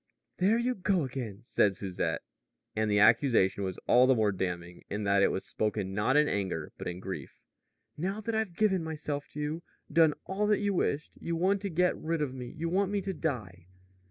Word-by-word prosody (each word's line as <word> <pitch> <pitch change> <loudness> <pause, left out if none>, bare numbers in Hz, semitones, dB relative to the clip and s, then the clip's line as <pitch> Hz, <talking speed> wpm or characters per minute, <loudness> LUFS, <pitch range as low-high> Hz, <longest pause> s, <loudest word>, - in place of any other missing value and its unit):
"There 200 +5 +3
you 245 +2 +1
go 190 -4 +1
again," 120 -6 -5
said 100 -4 +2
Susette, 95 -2 -2 0.5
and 110 0 +1
the 105 - +3
accusation 105 -2 +4
was 95 -2 -3
all 125 +1 +6
the 130 - +5
more 110 -3 +2
damning 90 -2 -4
in 105 +1 -3
that 100 -1 +3
it - - +6
was - - -2
spoken 105 -3 -2
not 110 +8 +2
in 150 0 +5
anger, 95 - -2
but - - -5
in 90 +1 -4
grief. 95 0 -7 0.6
"Now 190 +6 -2
that 230 +1 -3
I've 220 -5 -1
given 190 -4 +2
myself 150 -2 -4
to 150 - -6
you 150 +3 -2 0.3
done 160 -2 +5
all 200 +2 -1
that 210 -1 +3
you 205 -1 0
wished 150 -4 0
you 170 - -2
want 190 +4 +2
to 200 - -2
get 180 +1 +2
rid 165 -1 -1
of 135 -3 -3
me; 125 -2 -6
you 165 +2 -2
want 190 +3 +1
me 205 0 0
to 195 0 -3
die." 105 - -4
145 Hz, 210 wpm, -30 LUFS, -, 0.6 s, all